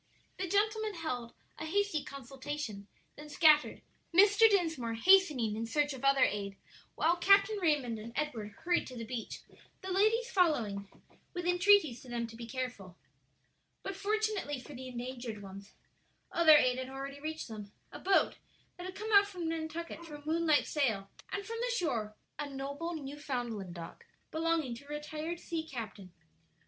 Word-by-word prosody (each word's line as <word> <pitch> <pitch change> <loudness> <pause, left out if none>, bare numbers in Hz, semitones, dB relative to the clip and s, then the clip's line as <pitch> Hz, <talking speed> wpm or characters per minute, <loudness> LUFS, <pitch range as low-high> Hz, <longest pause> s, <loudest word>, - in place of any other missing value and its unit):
The 375 - -1
gentlemen 425 +2 +1
held 250 -8 -4 0.2
a - - -4
hasty 400 -3 +1
consultation, 270 -5 -6 0.3
then 300 0 -10
scattered, 300 0 +4 0.3
Mr. 405 +5 +7
Dinsmore 320 - +1
hastening 290 - +5
in 225 +1 -3
search 290 +3 +1
of 265 - -9
other 275 -1 +5
aid, 200 -1 -1 0.4
while 340 +2 +2
Captain 400 +3 +5
Raymond 280 -9 +1
and 225 +2 -8
Edward 235 -9 -3
hurried 350 0 +1
to 255 - -9
the 230 - -5
beach, 230 -1 -5 0.4
the 375 - -5
ladies 440 +5 +2
following 230 - +1 0.5
with 355 -1 -3
entreaties 355 - +4
to 255 - -13
them 235 -1 -2
to 230 0 -10
be 230 0 -8
careful. 230 -8 -5 0.9
But 390 - -4
fortunately 410 -7 -1
for 290 - -11
the 260 0 -7
endangered 240 -3 -6
ones, 195 +1 -11 0.6
other 315 -3 +7
aid 255 -2 +3
had 260 0 -5
already 275 +1 -6
reached 315 +2 -5
them 210 -3 -8 0.2
a - - -8
boat 390 0 +3 0.4
that 360 +1 -6
had 375 - -8
come 435 +2 -5
out 400 0 +7
from 360 -5 -5
Nantucket 330 +1 -4
for 320 -3 -9
a 290 0 -12
moonlight 320 -1 +3
sail, 220 -10 0 0.2
and 400 0 -3
from 460 0 -5
the - - 0
shore 230 - -1 0.2
a 295 -1 -3
noble 280 +5 -4
Newfoundland 250 - -4
dog 170 -1 -9 0.3
belonging 320 -5 0
to 245 +4 -10
a - - -19
retired 305 +3 -4
sea 335 -2 -3
captain. 215 - -7
295 Hz, 165 wpm, -32 LUFS, 240-350 Hz, 0.9 s, Mr